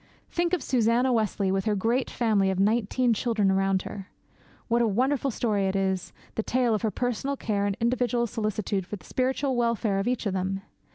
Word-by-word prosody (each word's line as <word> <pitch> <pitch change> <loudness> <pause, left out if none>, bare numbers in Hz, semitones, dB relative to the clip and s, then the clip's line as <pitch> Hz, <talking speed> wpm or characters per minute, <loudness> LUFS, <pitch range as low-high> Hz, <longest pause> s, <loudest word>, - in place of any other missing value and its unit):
Think 345 +1 0
of 360 - +1
Susanna 245 +1 +2
Wesley 205 -3 +1
with 195 +1 0
her 215 -2 +1
great 230 +6 0
family 210 -5 +2
of 190 -1 -1
nineteen 230 +4 +2
children 215 -3 +1
around 195 0 +1
her. 195 -2 -8 0.6
What 235 0 +2
a 235 - +3
wonderful 260 +6 +1
story 210 -5 0
it 190 - -1
is, 190 -1 -1 0.2
the - - -1
tale 245 0 +1
of 215 - 0
her 225 - +1
personal 250 +5 -2
care 205 -4 -1
and 200 - -2
individual 240 0 +1
solicitude 210 -4 -2
for - - -4
the 200 - -14
spiritual 260 +1 0
welfare 230 -4 +1
of 195 - -1
each 245 -1 -1
of 200 - 0
them! 190 +1 -2
220 Hz, 195 wpm, -27 LUFS, 195-245 Hz, 0.6 s, a